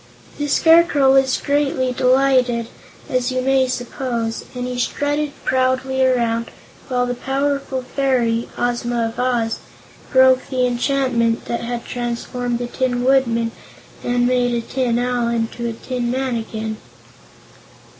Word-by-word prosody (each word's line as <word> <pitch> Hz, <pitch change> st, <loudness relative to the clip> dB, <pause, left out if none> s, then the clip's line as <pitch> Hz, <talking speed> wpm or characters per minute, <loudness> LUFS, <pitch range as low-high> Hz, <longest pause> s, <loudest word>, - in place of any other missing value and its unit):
The 290 Hz, -, -1 dB
Scarecrow 320 Hz, -3 st, +5 dB
was 265 Hz, -1 st, +3 dB
greatly 280 Hz, -3 st, 0 dB
delighted, 250 Hz, -2 st, +2 dB, 0.4 s
as 255 Hz, 0 st, 0 dB
you 255 Hz, 0 st, -1 dB
may 265 Hz, 0 st, +3 dB
suppose, 245 Hz, -2 st, -3 dB
and 250 Hz, 0 st, -3 dB
he 250 Hz, 0 st, -4 dB
strutted 290 Hz, +3 st, -1 dB
proudly 260 Hz, 0 st, +1 dB
around 235 Hz, -3 st, +1 dB, 0.4 s
while 250 Hz, -2 st, 0 dB
the 245 Hz, -, -2 dB
powerful 275 Hz, 0 st, -2 dB
fairy, 250 Hz, -3 st, 0 dB
Ozma 240 Hz, -1 st, 0 dB
of 240 Hz, -, -10 dB
Oz, 240 Hz, -3 st, 0 dB, 0.5 s
broke 260 Hz, -1 st, +5 dB
the 255 Hz, -2 st, +1 dB
enchantment 245 Hz, -2 st, 0 dB
that 235 Hz, -, -3 dB
had 235 Hz, 0 st, -4 dB
transformed 240 Hz, 0 st, -3 dB
the 245 Hz, -, -3 dB
Tin 245 Hz, 0 st, -1 dB
Woodman 235 Hz, -3 st, +2 dB, 0.5 s
and 245 Hz, 0 st, +1 dB
made 245 Hz, -1 st, +2 dB
a 235 Hz, -, 0 dB
Tin 250 Hz, -3 st, 0 dB
Owl 245 Hz, -1 st, 0 dB
into 235 Hz, 0 st, -2 dB
a -, -, -4 dB
Tin 245 Hz, +1 st, -3 dB
Man 260 Hz, 0 st, -1 dB
again. 220 Hz, -1 st, -4 dB
250 Hz, 135 wpm, -20 LUFS, 235-265 Hz, 0.5 s, Scarecrow